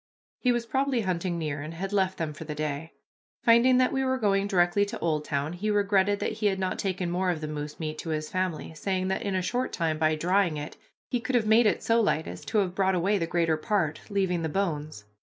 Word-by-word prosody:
He 250 - +2
was 240 -1 0
probably 265 0 0
hunting 180 -2 -1
near 150 -3 -3
and 155 +3 -7
had 195 +4 -4
left 190 -2 +1
them 160 -2 -3
for 155 - -8
the 150 -1 -6
day. 150 +1 -4 0.5
Finding 240 +2 +6
that 255 +1 +3
we 270 0 +1
were 260 0 +1
going 200 -4 +1
directly 180 0 +3
to 200 - -6
Oldtown, 150 -2 -1
he 200 +5 -2
regretted 205 -1 +2
that - - 0
he 215 -1 0
had 195 -1 +1
not 185 -1 -2
taken 185 -3 -1
more 180 +1 0
of 170 -3 0
the 155 - -4
moose 150 0 -6
meat 155 -1 -4
to 165 - -5
his 155 -1 -2
family, 185 -3 -3
saying 185 +3 -2
that 190 - -1
in 200 -2 -2
a 185 - 0
short 250 +7 -1
time, 160 -2 -1
by 155 0 +3
drying 175 0 +1
it, 150 +1 -6 0.4
he 245 - +1
could 255 +2 -2
have 230 -3 +3
made 220 +1 +5
it - - 0
so 230 0 +3
light 160 -7 +1
as 90 - -8
to 220 - -1
have 190 -4 +1
brought 190 0 +2
away 195 +4 +1
the 165 - -1
greater 165 -2 +1
part, 160 -3 -1
leaving 190 -4 0
the 160 - -1
bones. 155 - -2
185 Hz, 245 wpm, -27 LUFS, 160-205 Hz, 0.5 s, Finding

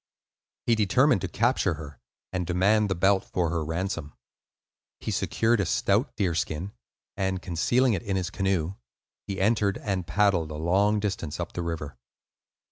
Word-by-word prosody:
He 120 - +3
determined 110 +2 +3
to 95 - -2
capture 105 -3 +1
her 75 -2 -10 0.3
and 90 -2 -2
demand 100 +4 +3
the 95 - 0
belt 95 +2 +3
for 85 -3 -1
her 85 -2 -1
ransom. 80 -1 -3 0.8
He - - -4
secured 115 0 +1
a 100 - +1
stout 100 - +1
deerskin, 90 -2 -1 0.4
and 95 -1 -1
concealing 120 +9 +2
it 90 - -1
in 100 - -2
his 95 0 -2
canoe, 95 -4 0 0.5
he 100 -1 -3
entered 100 0 +2
and 95 -4 -3
paddled 100 -6 +2
a 75 - -6
long 95 +7 +2
distance 95 -7 -3
up - - -4
the 90 - -3
river. 80 -6 -5
95 Hz, 155 wpm, -27 LUFS, 85-105 Hz, 0.8 s, He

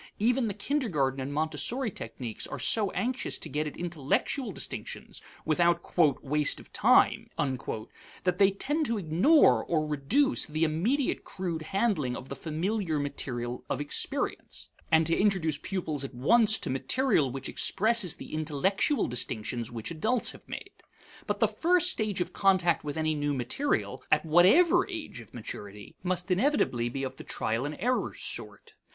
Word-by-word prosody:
Even 240 +3 +2
the 200 - -3
kindergarten 200 - 0
and 135 +2 -4
Montessori 160 - -1
techniques 120 -10 -6
are - - -6
so 210 -3 +3
anxious 250 +6 -2
to - - -5
get 150 +1 -2
at 150 - -8
intellectual 175 - -1
distinctions, - - -5 0.2
without 170 +2 +1 0.3
"waste 150 +1 0
of - - -16
time," - - +4
that 135 - -4
they 195 -1 +7
tend 290 +10 -1
to 230 - 0
ignore 170 - +4
or 155 -2 0
reduce 155 - +1
the 155 +1 -1
immediate 205 - 0
crude 175 -4 -4
handling 155 - 0
of 130 - -10
the 140 - -5
familiar 165 - -2
material 125 -4 -4
of 135 - -1
experience, 145 0 -3 0.2
and 160 0 +5
to 165 - +2
introduce 180 -8 +1
pupils 155 -5 -2
at 135 -1 -7
once 220 - +4
to - - -4
material 150 - +2
which 135 +1 -4
expresses 215 -3 +2
the - - -10
intellectual 160 - +1
distinctions 120 -1 -2
which 115 +5 -4
adults 220 +9 0
have - - -15
made. - - -7 0.6
But - - -1
the - - +4
first 355 +1 +2
stage 210 -4 -1
of - - -3
contact 185 -4 +3
with 145 0 -4
any 155 0 +1
new 145 -1 -1
material, 135 - -1
at - - +3
whatever 310 - +5
age 325 - -6
of 115 -4 -13
maturity, 105 -3 -9
must 180 +1 -2
inevitably 180 - +1
be 135 +3 -4
of 130 0 -5
the - - -9
trial 115 +5 -2
and 150 - -6
error 250 +6 -1
sort. - - -2
165 Hz, 160 wpm, -29 LUFS, 140-215 Hz, 0.6 s, they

